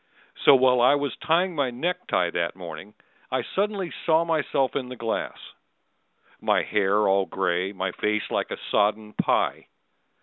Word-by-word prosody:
So 140 - +9
while 125 -1 +4
I 130 +4 +5
was 145 -1 -2
tying 175 +3 +1
my 140 -5 0
neck 175 +9 -3
tie 90 -2 +1
that 85 0 -2
morning 90 +3 -9 0.3
I - - -1
suddenly 200 -2 -2
saw 165 0 +3
myself 150 -5 0
in 125 -2 -3
the 125 - -7
glass: 115 -2 -3 1.0
My - - +2
hair 105 +1 +1
all 95 0 +2
gray, 95 +1 -1
my 95 -1 -3
face 105 +3 -2
like - - -1
a - - -4
sodden 105 +1 +1
pie. - - 0
120 Hz, 160 wpm, -25 LUFS, 95-145 Hz, 1.0 s, So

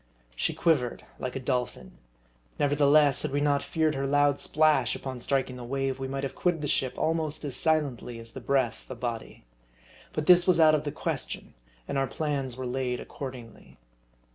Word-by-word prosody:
She - - -1
quivered 135 -8 +1
like 130 -1 -4
a - - -2
dolphin. 125 - -3 0.6
Never 145 0 +1
theless, 145 -1 +5
had 155 - -1
we 140 +1 -1
not 145 -1 +2
feared 160 -1 0
her 135 -1 -2
loud 145 0 +3
splash 155 -5 +3
upon 130 -2 -6
striking 130 0 -1
the 125 - -8
wave, 135 +1 -2
we 135 - -3
might 135 +1 -4
have 135 - -3
quitted 175 -3 0
the - - -1
ship 130 -2 0
almost 155 -1 -1
as 140 - -1
silently 140 -7 +1
as 115 0 -9
the - - -7
breath 135 -4 0
the 130 - -6
body. 115 - -5 0.7
But 155 - -3
this 180 +1 +6
was 180 -2 +4
out 155 -1 +7
of 155 0 +1
the 145 - -2
question, - - -4 0.3
and 135 - -1
our 135 - +1
plans 140 -5 -2
were 130 - -4
laid 125 0 -2
accordingly. 125 -5 -9
135 Hz, 190 wpm, -28 LUFS, 125-150 Hz, 0.7 s, out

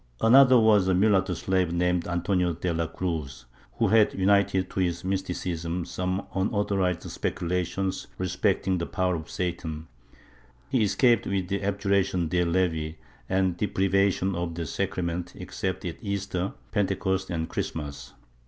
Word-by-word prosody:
Another 130 +2 +7
was 105 -4 +4
a 95 - +3
mulatto 95 -2 +3
slave 95 -2 0
named 90 0 +1
Antonio 90 0 0
de 85 +1 -2
la 80 0 -1
Cruz, 80 -7 -4 0.3
who - - +1
had 110 -1 +4
united 95 -1 +2
to - - -3
his 90 -1 0
mysticism 90 -2 -2
some 90 +2 -2
unauthorized 95 -2 0
speculations 90 +2 -2
respecting 95 0 0
the 85 - -3
power 95 -2 0
of 80 -1 -5
Satan; 80 -3 -4 0.8
he 130 -3 +2
escaped 115 +2 +3
v;ith 95 -2 -1
abju 100 0 -1
ration 90 -3 +2
de 90 +1 +2
levi 85 -3 0 0.3
and 95 -2 +1
deprivation 95 -1 +1
of 85 -1 -3
the 85 -1 -3
sacrament 85 +3 -3
except 95 0 -4
at 85 - -4
Easter, 100 -3 -2 0.2
Pentecost 95 -1 0
and 80 -2 -2
Christmas. 70 -3 -5
90 Hz, 135 wpm, -26 LUFS, 85-95 Hz, 0.8 s, Another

